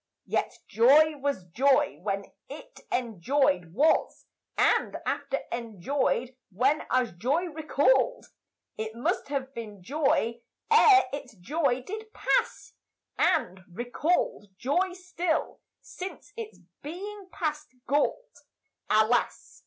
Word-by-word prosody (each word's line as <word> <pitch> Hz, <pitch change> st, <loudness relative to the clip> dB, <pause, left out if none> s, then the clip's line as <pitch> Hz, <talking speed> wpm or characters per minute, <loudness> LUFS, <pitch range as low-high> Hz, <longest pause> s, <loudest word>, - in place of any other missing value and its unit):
Yet -, -, -1 dB
joy 295 Hz, +7 st, +5 dB
was 280 Hz, -9 st, -2 dB
joy 275 Hz, -, +2 dB
when 195 Hz, 0 st, -2 dB, 0.2 s
it -, -, -11 dB
enjoyèd 225 Hz, -, +1 dB
was 285 Hz, -, +2 dB, 0.3 s
And -, -, +2 dB
after 275 Hz, -1 st, -2 dB
enjoyed 240 Hz, +3 st, -1 dB
when 260 Hz, -, +1 dB
as 255 Hz, -2 st, +1 dB
joy 260 Hz, -, 0 dB
recalled, 300 Hz, -, +2 dB, 0.5 s
It 220 Hz, 0 st, -4 dB
must 235 Hz, -, -1 dB
have 275 Hz, -1 st, -3 dB
been 210 Hz, -6 st, -8 dB
joy 240 Hz, -, 0 dB, 0.3 s
ere 430 Hz, -3 st, +7 dB
its 270 Hz, -5 st, -6 dB
joy 260 Hz, -, -1 dB
did 435 Hz, +6 st, -7 dB
pass -, -, 0 dB, 0.5 s
And, 185 Hz, -, +2 dB
recalled, 245 Hz, -, -1 dB
joy 355 Hz, -, 0 dB
still, 360 Hz, -2 st, -2 dB, 0.2 s
since 380 Hz, +2 st, -9 dB
its 450 Hz, -2 st, -7 dB, 0.2 s
being 385 Hz, +5 st, -7 dB
past 300 Hz, -2 st, -3 dB, 0.2 s
galled. 290 Hz, -, 0 dB, 0.5 s
Alas! 220 Hz, +3 st, +1 dB
275 Hz, 105 wpm, -28 LUFS, 230-320 Hz, 0.5 s, ere